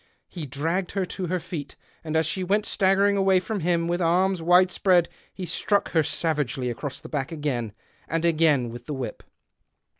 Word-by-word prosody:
He 165 -5 -7
dragged 165 +7 -2
her 195 -2 0
to 180 0 -5
her 180 +2 -1
feet, 160 -4 -7 0.3
and 155 -1 -4
as 160 0 +3
she 185 +4 -2
went 205 +3 +1
staggering 200 +1 +3
away 190 -1 +4
from 210 +3 -3
him 170 -1 +1
with 175 +1 -1
arms 180 +2 +2
wide 180 +2 +5
spread 180 -3 +3 0.2
he 185 - -6
struck 200 +4 0
her 160 - +4
savagely 145 -5 -1
across 130 +4 -5
the - - -11
back 140 -1 -3
again 135 -8 -2 0.4
and 165 +2 -1
again 155 -7 +3
with 120 +1 -10
the 150 - -3
whip. 130 -2 -5
170 Hz, 185 wpm, -25 LUFS, 150-185 Hz, 0.4 s, wide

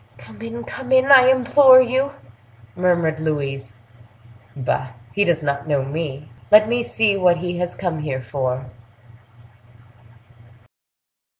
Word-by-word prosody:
"Come 110 -3 -15
in, 115 +1 -7
come 250 - -9
in, 260 +1 +3
I 260 -2 +8
implore 260 +1 +6
you!" 260 +3 0 0.6
murmured 170 -3 0
Louise. 135 -6 -4 0.8
"Bah! 130 -1 -3 0.2
he 205 - +1
does 170 -4 0
not 140 0 -3
know 140 -3 -1
me. 145 -1 -6 0.2
Let 215 0 +6
me 240 +1 -1
see 220 -3 0
what 180 -3 +2
he 175 0 -5
has 180 0 -3
come 175 -4 -4
here 140 -3 -4
for." 130 +1 -4
165 Hz, 125 wpm, -20 LUFS, 135-220 Hz, 0.8 s, I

